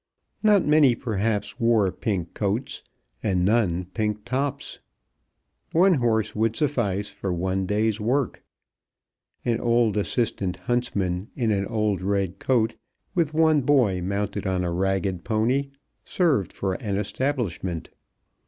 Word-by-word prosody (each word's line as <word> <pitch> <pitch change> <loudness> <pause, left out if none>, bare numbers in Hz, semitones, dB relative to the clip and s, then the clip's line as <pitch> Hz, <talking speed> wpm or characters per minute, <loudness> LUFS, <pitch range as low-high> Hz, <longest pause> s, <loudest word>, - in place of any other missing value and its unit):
Not 210 -3 +4
many 150 -5 +5
perhaps 110 -3 -2
wore 115 -5 +3
pink 95 -3 -3
coats, 105 +6 -2 0.4
and 90 -4 +1
none 95 -5 +2
pink 105 -1 -2
tops. 140 +2 -2 0.9
One 185 +3 +5
horse 115 - +1
would 110 +1 +1
suffice 110 -9 0
for 100 -1 -4
one 95 +2 -1
day's 105 +1 0
work. 130 +5 0 1.0
An 115 -1 +1
old 115 -3 +2
assistant 100 -2 -1
huntsman 100 -6 -1
in 115 -4 0
an 100 -1 0
old 105 -4 0
red 95 -1 -1
coat, 115 -3 +1 0.4
with 165 -4 0
one 160 -2 +4
boy 125 -9 +3
mounted 100 +2 -2
on 95 -1 0
a 85 - -1
ragged 95 0 -1
pony, 125 +5 +1 0.3
served 150 - +1
for 95 -1 -2
an 100 +1 -3
establishment. 105 - -2
105 Hz, 125 wpm, -25 LUFS, 95-125 Hz, 1.0 s, many